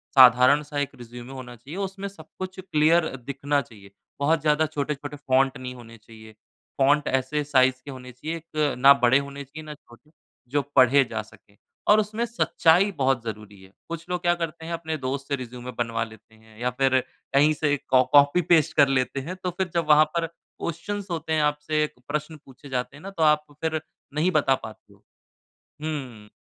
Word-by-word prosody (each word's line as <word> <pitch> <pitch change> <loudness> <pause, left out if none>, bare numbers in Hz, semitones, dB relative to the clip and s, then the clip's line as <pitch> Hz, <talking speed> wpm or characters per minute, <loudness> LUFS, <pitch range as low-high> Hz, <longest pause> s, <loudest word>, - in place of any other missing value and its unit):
साधारण-सा 130 +4 +6
एक 145 -1 -1
रिज़्यूमे 120 +2 -10
होना 125 -2 -9
चाहिए, 135 +10 -10
उसमें 195 0 -4
सब 165 -6 -12
कुछ 185 0 -6
क्लियर 160 -2 +3
दिखना 140 +3 -2
चाहिए। 100 -7 -15 0.3
बहुत 155 +2 +2
ज़्यादा 150 +1 +2
छोटे-छोटे 145 -1 -4
फॉन्ट 130 +1 +3
नहीं 125 0 -6
होने 115 -1 -13
चाहिए, 110 0 -15 0.5
फॉन्ट 145 +2 +3
ऐसे 135 +3 0
साइज़ 130 -2 +3
के 140 - -7
होने 125 -1 -10
चाहिए 155 +7 -5
एक 155 -3 -2
ना 140 +2 +8
बड़े 130 0 +4
होने 140 0 -7
चाहिए 150 +4 -11
ना 150 - -7
छोटे 150 +2 -20 0.4
जो 145 0 +2
पढ़े 135 +2 +6
जा 110 -1 -2
सकें 105 -1 -20 0.3
और 210 +1 +7
उसमें 215 +3 -1
सच्चाई 200 -5 +3
बहुत 130 -3 +1
ज़रूरी 105 -3 -8
है। 95 - -17 0.2
कुछ 170 0 -6
लोग 180 -1 -2
क्या 175 -1 +3
करते 165 -1 -5
हैं 170 - -4
अपने 160 -1 -3
दोस्त 135 0 -4
से 140 - 0
रिज़्यूमे 125 0 -8
बनवा 115 -1 -1
लेते 110 0 -14
हैं 110 0 -20
या 125 - 0
फिर 130 -1 +4 0.3
कहीं 145 +3 +5
से 150 -1 +1
कॉ 130 -1 +5
कॉपी-पेस्ट 155 +3 +5
कर 140 -2 +7
लेते 135 0 0
हैं 185 - -4
तो 180 - 0
फिर 190 -1 -1
जब 170 -2 0
वहाँ 150 +1 +7
पर 165 -1 0 0.3
क्वेश्चन्स 195 +4 -4
होते 160 -1 -2
हैं, 155 - +2
आपसे 150 +1 +1 0.2
प्रश्न 150 +1 -3
पूछे 135 +2 -14
जाते 130 +1 -3
हैं 150 - -14
ना 195 - -6
तो 165 -4 -1
आप 150 0 +4 0.2
फिर 160 -1 -1 0.3
नहीं 160 +5 +1
बता 140 -5 +3
पाते 110 -3 -12
हो। - - -25 0.8
हुँ। 130 -9 -5
145 Hz, 190 wpm, -25 LUFS, 125-160 Hz, 0.8 s, ना